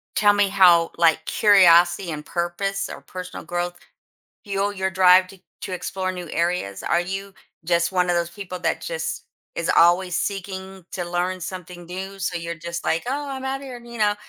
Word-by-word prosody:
tell 205 +1 +5
me 205 -1 +2
how, 175 -4 +5
like, 160 -1 +3
curiosity 175 -3 +5
and 150 -1 -6
purpose 195 +3 -2
or - - -8
personal 180 -2 -8
growth 175 +1 -3 0.7
fuel 200 -1 -1
your 190 -1 -1
drive 185 0 +5
to 190 0 -15 0.2
to - - -5
explore 185 +1 -3
new 180 -3 -7
areas? 170 - -1
Are 170 - +2
you 195 +2 -5 0.3
just 170 +1 +1
one 180 -1 +1
of 175 - +2
those 170 0 0
people 185 -1 -7
that - - -1
just - - -4 0.3
is - - -2
always 175 +1 +4
seeking 190 -1 -4
to 180 -2 -4
learn 175 +2 -2
something 180 -1 -7
new, 190 +2 -7
so 175 -1 -2
you're 170 0 -4
just 170 +2 -6
like, 165 - 0
"Oh, 285 +2 -2
I'm 265 -1 -5
outta 270 +1 -3
here," 255 -3 -8
you 235 0 -10
know? 210 -1 +2
185 Hz, 185 wpm, -23 LUFS, 175-195 Hz, 0.7 s, tell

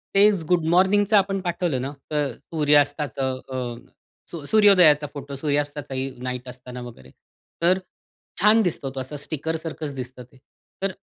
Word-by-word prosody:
तेच 200 -3 +5
गुड 175 -2 +3
मॉर्निंगचं 195 +4 +4
आपण 195 0 +1
पाठवलं 175 -7 -1
ना, 135 - -3 0.2
तर 145 -3 0 0.2
सूर्यास्ताचं 145 -4 +1
अ, 125 -2 -4 0.6
स - - -6 0.2
सूर्योदयाचा 180 -9 +6
फोटो 140 -1 -7
सूर्यास्ताचाही 145 -2 -2
नाईट 125 0 -4
असताना 125 0 -9
वगैरे, 115 - -11 0.5
तर 180 +2 +4 0.6
छान 215 +3 +6
दिसतो 170 -8 -1
तो - - -3
असा 130 +3 -6
स्टिकर 155 +2 -3
सारखंच 155 -2 -6
दिसतं 125 -1 -7
ते. 130 +2 -22 0.4
तर 195 - 0
145 Hz, 140 wpm, -24 LUFS, 130-180 Hz, 0.6 s, सूर्योदयाचा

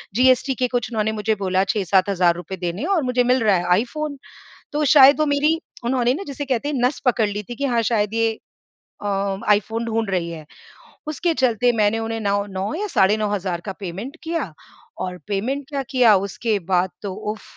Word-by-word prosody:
GST 255 +1 +4
के 250 +1 0
कुछ 245 -1 -2
उन्होंने 220 -1 0
मुझे 215 0 0
बोला, 190 -1 +1
6-7 195 -1 +1
हज़ार 175 -3 +3
रुपए 175 +2 -6
देने 175 +2 -4
है 320 - -2
और 350 -7 +2
मुझे 250 -1 +1
मिल 250 +1 +3
रहा 205 -3 +4
है 180 +2 +2
iPhone। 300 +2 -5 0.6
तो 300 0 0
शायद 280 +1 +8
वो 305 - +3
मेरी, 300 +3 +2 0.3
उन्होंने 250 0 +2
ना, 395 - -5
जिसे 285 +1 -5
कहते 265 +2 -1
हैं, 295 - -2
नस 260 - 0
पकड़ 235 -4 +3
ली 205 +1 -4
थी 240 - -5
कि 280 - -2
हाँ, 240 -3 +1
शायद 210 -1 +1
ये 225 0 +2 0.7
अ, - - -4 0.5
iPhone 225 +3 -2
ढूँढ 225 -2 -1
रही 170 -3 -1
है। 160 -2 -8 0.6
उसके 325 +3 0
चलते 245 0 +3
मैंने 215 +2 +2
उन्हें 225 0 -3
नाओ 200 0 0
9 195 +1 -4
या 415 +4 -2
साढ़े 200 +3 +4
9 210 -1 -1
हज़ार 185 -4 -2
का 195 - -3
पेमेंट 200 - -6
किया 320 - -3 0.5
और 180 -1 -4
पेमेंट 255 +8 -2
क्या 280 -2 -2
किया, 240 -5 +5
उसके 200 +3 -1 0.2
बाद 180 +1 +3
तो 200 -3 -4
उफ़! 210 +2 -5
225 Hz, 205 wpm, -21 LUFS, 195-260 Hz, 0.7 s, शायद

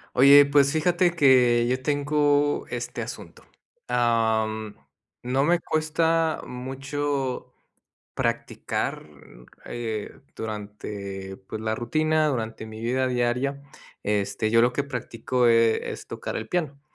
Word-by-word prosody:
Oye, 140 +2 +8
pues, 140 -1 +3
fíjate 175 +2 +2
que 125 -6 +4
yo 130 +1 0
tengo 145 0 +1
este, - - -5
asunto, - - -8 0.4
am, 110 -3 0 0.5
no 130 +3 +1
me 170 +3 +3
cuesta 160 +1 0
mucho 135 +1 -4 0.6
practicar, 75 - -2 0.5
eh, 110 -3 -5 0.2
durante 100 -3 -6
pues, 110 - -5
la 110 0 -1
rutina 155 +7 +1
durante 115 -5 -3
mi 110 0 -9
vida 130 +3 0
diaria, 125 +3 0 0.4
este, 105 +1 0
yo 115 0 +6
lo 120 +1 +3
que 140 +3 -1
practico, 125 -1 -1
eh, 115 -1 +3
es - - -8
tocar - - -5
el - - -5
piano. 150 -6 -2
125 Hz, 115 wpm, -25 LUFS, 110-145 Hz, 0.6 s, Oye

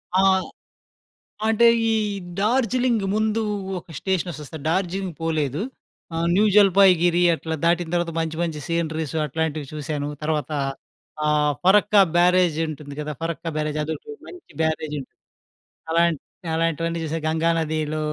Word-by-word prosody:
ఆ! - - +5 1.3
అంటే 225 +1 +5 0.2
ఈ - - +2 0.5
డార్జిలింగ్ 240 0 +1
ముందు 220 +1 +1 0.4
ఒక 165 - -16
స్టేషన్ 185 -2 -1
వస్తుంది. 155 0 -8
డార్జీలింగ్ 185 0 -1
పోలేదు. 155 -1 -1 0.5
ఆ! - - -2 0.2
న్యూ 205 +3 +4
జలపాయ్ 195 -2 +7
గిరి 175 0 +3
అట్లా 160 0 -4
దాటిన 170 -1 +2
తర్వాత 175 -1 0
మంచి 160 -1 -2
మంచి 160 -3 -2
సీనరీస్ 160 -2 -2
అట్లాంటివి 155 -1 -2
చూసాను. 145 -1 -3
తర్వాత 155 -1 -1 0.7
ఆహ్, 150 -1 +2
పరక్కా 205 +1 +5 0.2
బ్యారేజ్ 180 -2 +4
ఉంటుంది 145 -2 -7
గదా! 150 0 -3
పరక్కా 165 0 -3
బ్యారేజ్ 150 0 -2
అదోటి 160 - -5
మంచి 360 -1 -13
బ్యారేజుంటు 155 -3 -2 0.8
అలాంట్ 170 -3 +2 0.3
అలాంటివన్నీ 165 +1 0
చూసా. 160 +1 -2
గంగా 160 +1 +1
నదిలో 155 -1 -1
165 Hz, 125 wpm, -23 LUFS, 155-185 Hz, 1.3 s, జలపాయ్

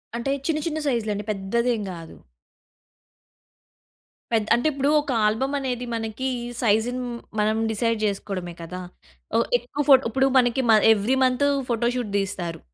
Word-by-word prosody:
అంటే 235 +3 -2 0.2
చిన్న, 315 -2 +1
చిన్న 315 -1 -2
సైజ్‌లండి 215 -5 -1
పెద్ద‌దేం 225 +4 -1
కాదు. 165 -2 -10 2.2
పెద్ 220 -2 +2
అంటే 240 +6 +2
ఇప్పుడు 280 0 0
ఒక 290 - -4
ఆల్బమ్ 230 +6 0
అనేది 250 -2 -3
మనకి, 225 +3 -3 0.3
సైజ్‌ని 235 +3 +1 0.4
మనం 215 +1 +2
డిసైడ్ 230 +1 0
చేసుకోవడమే 195 -3 -3
కదా! 180 +2 -7 0.5
ఒ - - +5 0.2
ఏకువ 245 +5 -4
ఫోట్ 270 -1 +8
ఇప్పుడు 265 +4 +2
మనకి 245 +1 +2
మ - - +8 0.2
ఎవ్రీ 220 +5 0
మంత్తు 255 +2 +2 0.2
ఫోటో 235 0 +1
షూట్ 240 -5 -3
తీస్తారు. 180 -4 -4
230 Hz, 135 wpm, -24 LUFS, 210-255 Hz, 2.2 s, ఫోట్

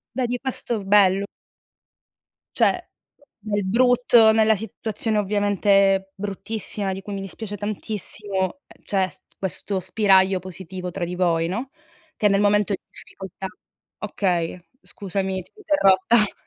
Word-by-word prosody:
Dai 255 -1 0
di 245 +1 -2
questo 240 -4 -3
bello 195 -1 +4 1.3
Cioè, - - +2 0.6
nel 205 -2 -1
brutto 240 0 +5
nella 220 0 +4
situazione 220 +1 -3
ovviamente 200 -1 +2
bruttissima 205 0 -3
di 190 +1 -6
cui 205 0 -6
mi 195 - -4
dispiace 205 +2 -7
tantissimo, 205 +1 -3
ehm, - - -20
c'è 190 -2 +1
s 165 - -13 0.2
questo 190 +1 -2
spiraglio 190 0 +3
positivo 185 0 -7
tra 175 - -2
di 175 +1 -5
voi, 165 -2 +1
no, 235 +9 -4 0.5
che 210 - +3
nel 200 0 +2
momento 205 0 +3
di - - -4
difficoltà 190 0 -9 0.5
okay, 180 -4 -1 0.2
scusami, 190 -1 -3
ti - - -21
ho - - -27
interrotta. 210 - +3
200 Hz, 130 wpm, -23 LUFS, 190-215 Hz, 1.3 s, brutto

